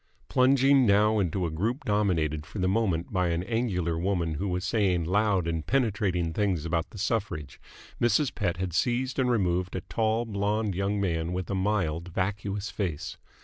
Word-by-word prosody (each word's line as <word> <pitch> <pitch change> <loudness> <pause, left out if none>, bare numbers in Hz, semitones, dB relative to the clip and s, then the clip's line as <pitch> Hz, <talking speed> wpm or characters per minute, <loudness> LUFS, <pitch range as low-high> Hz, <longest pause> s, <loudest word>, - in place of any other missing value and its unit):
Plunging 135 0 +4
now 105 +2 +4
into 90 -1 0
a 80 - -2
group 110 - -2
dominated 85 -8 +1
for 75 - -10
the 90 -1 +1
moment 95 -4 0
by 90 -2 +2
an 85 +1 -1
angular 95 -7 -1
woman 85 -3 0
who 90 +7 -3
was 90 -1 -2
saying 95 -4 +1
loud 95 +1 +1
and 80 -2 -2
penetrating 95 - 0
things 95 -6 0
about 85 -1 -1
the - - -12
suffrage, 100 - -3 0.4
Mrs. 120 +4 +2
Pett 95 -4 -1
had 90 -1 -3
seized 125 +8 0
and 130 -1 +2
removed 90 -5 0
a 95 - -2
tall, 110 +4 0
blonde 105 0 -1
young 100 +3 -1
man 85 -3 -1
with 90 +2 -3
a - - 0
mild, 95 -4 0
vacuous 100 +3 -3
face. 85 -8 -4
95 Hz, 175 wpm, -27 LUFS, 85-110 Hz, 0.4 s, Plunging